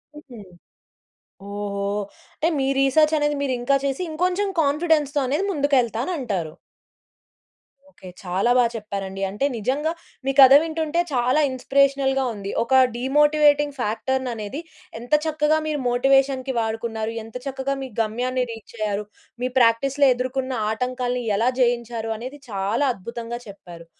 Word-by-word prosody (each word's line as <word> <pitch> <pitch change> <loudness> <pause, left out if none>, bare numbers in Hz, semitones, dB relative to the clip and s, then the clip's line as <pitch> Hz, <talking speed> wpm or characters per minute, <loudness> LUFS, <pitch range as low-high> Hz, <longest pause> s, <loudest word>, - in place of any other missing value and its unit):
హుహు. 275 -6 -12 1.1
ఓహో! 200 -1 -4 0.5
అంటే 320 - 0
మీ 270 - 0
రీసర్చ్ 305 +3 +4
అనేది 295 0 0
మీరు 270 -2 0
ఇంకా 275 +3 +2
చేసి 275 +4 -1
ఇంకొంచెం 365 +5 0
కాన్‌ఫిడెన్స్‌‌తో 300 -1 +1
అనేది 290 +9 0
ముందుకు 285 -3 +1
ఎళ్తాను 235 +7 -3
అంటారు. 190 - -3 1.4
ఓకే. 190 -9 -13
చాలా 190 +5 0
బా 250 - +5
చెప్పారండి. 195 -3 -5
అంటే 205 +8 -2
నిజంగా 275 +8 -1 0.3
మీ 270 - +2
కథ 265 0 +10
వింటుంటే 320 0 -2
చాలా 250 +3 +2
ఇన్స్‌పిరేషనల్‌గా 270 +1 +1
ఉంది. 200 -1 -6
ఒక 260 +2 +4
డీమోటింగ్ 295 +2 +3
ఫ్యాక్టర్ 245 +4 -1
ననేది 230 +4 -5 0.4
ఎంత 240 +5 -7
చక్కగా 310 0 +2
మీరు 300 -1 -1
మోటివేషన్‌కి 270 +1 +2
వాడుకున్నారు. 225 0 -3
ఎంత 225 +1 -14
చక్కగా 275 0 -2
మీ 265 - -6
గమ్యాన్ని 250 +4 -1
రీచ్ 225 0 -11
అయ్యారు. 210 -1 -2 0.4
మీ 255 - 0
ప్రాక్టిస్‌లో 270 +4 +3
ఎదుర్కొన్న 260 +1 -3 0.2
ఆటంకాల్ని 250 +1 -2
ఎలా 230 +4 +2
జయించారు? 235 -2 0
అనేది 255 +6 -8
చాలా 205 +8 0
అద్భుతంగా 235 +4 -6
చెప్పారు. 175 -4 -12
255 Hz, 130 wpm, -23 LUFS, 225-285 Hz, 1.4 s, కథ